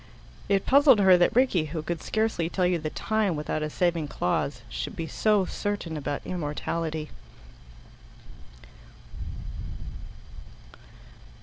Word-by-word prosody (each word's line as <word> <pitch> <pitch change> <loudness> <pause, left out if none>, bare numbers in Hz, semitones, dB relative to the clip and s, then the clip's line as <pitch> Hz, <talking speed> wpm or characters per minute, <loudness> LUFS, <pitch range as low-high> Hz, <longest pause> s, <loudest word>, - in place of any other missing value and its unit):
It 195 -1 +2
puzzled 280 -3 +6
her 190 -2 +7
that 175 +3 +3
Rickie, 240 -11 +3
who 155 +1 -4
could 170 0 -3
scarcely 220 -7 0
tell 185 0 0
you 180 -1 +2
the 155 0 -3
time 215 0 0
without 150 +1 -2
a 155 - -2
saving 170 -1 0
clause, 125 +2 -1
should - - -5
be 165 -3 -3
so 205 +5 +2
certain 200 -4 -3
about 145 -1 -4
immortality. 160 -1 -3
170 Hz, 115 wpm, -27 LUFS, 155-200 Hz, -, her